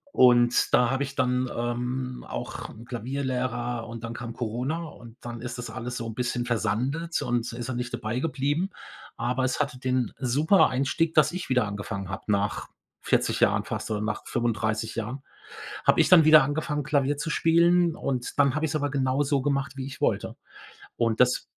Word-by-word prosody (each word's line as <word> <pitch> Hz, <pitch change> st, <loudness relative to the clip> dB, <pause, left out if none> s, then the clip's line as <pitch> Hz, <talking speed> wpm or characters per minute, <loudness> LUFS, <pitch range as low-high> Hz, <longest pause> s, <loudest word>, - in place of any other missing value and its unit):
und 120 Hz, -1 st, +5 dB
da 125 Hz, -1 st, +5 dB
habe 135 Hz, +1 st, 0 dB
ich 140 Hz, 0 st, -6 dB
dann, 125 Hz, -1 st, 0 dB
ähm, 125 Hz, +2 st, -3 dB
auch -, -, -6 dB, 0.2 s
Klavierlehrer 125 Hz, -1 st, -3 dB
und 115 Hz, 0 st, -7 dB
dann 115 Hz, -, -5 dB
kam 120 Hz, -1 st, -6 dB
Corona 125 Hz, +9 st, -3 dB
und 120 Hz, -5 st, -12 dB
dann 120 Hz, -1 st, -7 dB
ist 120 Hz, 0 st, -5 dB
das 120 Hz, -2 st, -6 dB
alles 120 Hz, +2 st, -5 dB
so 115 Hz, -, -4 dB
'n 110 Hz, -, -6 dB
bisschen 120 Hz, -1 st, -1 dB
versandet 125 Hz, +9 st, -1 dB
und 120 Hz, 0 st, -1 dB
da -, -, -8 dB
ist 120 Hz, -, -5 dB
er 130 Hz, -, -3 dB
nicht 120 Hz, 0 st, -4 dB
dabei 120 Hz, +1 st, -2 dB
geblieben. 150 Hz, +5 st, 0 dB, 0.5 s
Aber 125 Hz, +3 st, -1 dB
es 130 Hz, +2 st, 0 dB
hatte 140 Hz, -3 st, -1 dB
den 130 Hz, -1 st, -1 dB
super 145 Hz, +9 st, +3 dB
Einstieg, 140 Hz, +5 st, 0 dB
dass 155 Hz, +2 st, +4 dB
ich 180 Hz, -5 st, -5 dB
wieder 125 Hz, -5 st, +2 dB
angefangen 100 Hz, -1 st, -5 dB
habe, 95 Hz, -, -5 dB
nach 100 Hz, +1 st, -1 dB, 0.3 s
40 -, -, +1 dB
Jahren -, -, +3 dB
fast -, -, -4 dB
oder 105 Hz, -, 0 dB
nach 105 Hz, 0 st, -3 dB
35 110 Hz, -1 st, -1 dB
Jahren, 115 Hz, +4 st, -4 dB, 0.6 s
habe -, -, +4 dB
ich -, -, +5 dB
dann 170 Hz, -3 st, +8 dB
wieder 155 Hz, -2 st, +8 dB
angefangen 150 Hz, +1 st, -2 dB
Klavier 145 Hz, 0 st, +1 dB
zu 160 Hz, +3 st, -3 dB
spielen 170 Hz, +1 st, +3 dB
und 130 Hz, 0 st, -3 dB
dann 140 Hz, -2 st, +4 dB
habe 150 Hz, -, -1 dB
ich's 155 Hz, -1 st, -1 dB
aber 145 Hz, -1 st, -1 dB
genauso 135 Hz, +1 st, +1 dB
gemacht, 140 Hz, -1 st, -1 dB
wie 135 Hz, -1 st, -5 dB
ich 140 Hz, -1 st, -8 dB
wollte. -, -, -1 dB, 0.6 s
Und 115 Hz, -1 st, 0 dB
das 125 Hz, 0 st, +3 dB
125 Hz, 185 wpm, -26 LUFS, 120-140 Hz, 0.6 s, dann